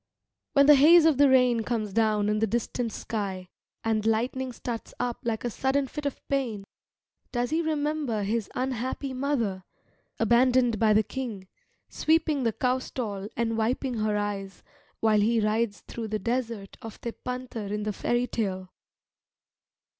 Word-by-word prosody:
When 280 0 +6
the 295 - +9
haze 315 +4 +7
of 315 -5 +4
the 285 -1 +7
rain 250 -3 +4
comes 215 -3 -2
down 215 -1 +2
in 210 0 +1
the 220 - +2
distant 235 +1 -2
sky, 195 -5 -4 0.3
and 220 -1 +1
lightning 245 +4 0
starts 235 -1 -6
up 245 -1 -2
like 225 -2 -2
a 240 - -1
sudden 270 +4 +1
fit 290 +2 -4
of 280 - -7
pain, 245 -8 -1 0.7
does 245 0 -1
he 320 +2 +2
remember 300 -7 -1
his 215 +1 -1
unhappy 260 +1 -2
mother, 245 -8 -1 0.6
abandoned 240 0 +3
by 220 -2 +4
the 215 +1 +4
king, 220 -7 -6 0.4
sweeping 315 -2 +1
the 230 -2 +1
cow 255 +3 +1
stall 205 -6 -5
and 225 -1 0
wiping 250 +3 0
her 215 -1 +1
eyes, 195 -2 -4 0.4
while 220 -1 +4
he 230 +2 +3
rides 215 0 0
through 230 -1 -6
the 215 0 -1
desert 230 -2 -3
of 225 -1 -9
Tepântar 240 -2 -5
in 210 +1 -2
the 210 0 -2
fairy 240 +4 0
tale? 190 -6 -3
235 Hz, 155 wpm, -27 LUFS, 215-260 Hz, 0.7 s, the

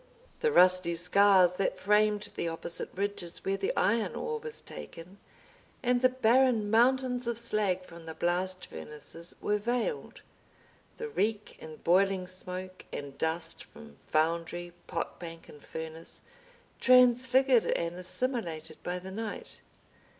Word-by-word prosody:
The 465 - +2
rusty 185 - +5
scars 185 +1 +5
that 195 - 0
framed 210 0 +2
the 170 - -2
opposite 165 +1 -3
ridges 195 -3 -4
where 195 - +1
the 195 0 -1
iron 225 +2 +1
ore 460 0 -3
was 460 0 -7
taken 180 +4 -10 0.6
and 245 0 +2
the 255 - +5
barren 250 -3 +3
mountains 250 +1 +3
of 235 -2 0
slag 210 -6 +1
from 170 -1 -13
the 160 - -6
blast 185 +2 0
furnaces 165 +3 -8
were 210 0 +1
veiled; 245 - -2 0.8
the 460 - -4
reek 215 - -2
and 155 -1 -11
boiling 190 +1 +3
smoke 185 0 -6
and 140 -1 -7
dust 165 +1 0
from 75 -1 -15
foundry, 170 +2 -1
pot - - -4
bank, 165 -1 -9
and 150 - -14
furnace, 160 0 -7 0.6
transfigured 250 0 +5
and 170 0 -1
assimilated 180 - -3
by 180 0 -3
the 185 +1 -8
night. 215 +1 -6
190 Hz, 135 wpm, -30 LUFS, 170-235 Hz, 0.8 s, rusty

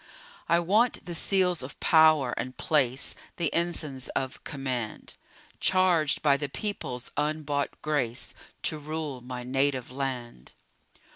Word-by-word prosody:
I 170 - +5
want 210 +8 +2
the 175 - -5
seals 180 0 +2
of 130 +2 -8
power 155 -5 +5
and 130 0 -5
place, 135 -3 +1 0.2
The 170 -3 -1
ensigns 155 -6 -1
of 130 -1 -3
command; 130 -6 -4 0.5
Charged 180 -5 +3
by 140 -2 +5
the 145 0 -3
People's 130 - -4
unbought 150 -1 -1
grace 140 -5 -1 0.3
To 155 - 0
rule 150 -3 -4
my 125 0 -6
native 135 0 0
land. 125 - -5
145 Hz, 125 wpm, -28 LUFS, 130-160 Hz, 0.5 s, I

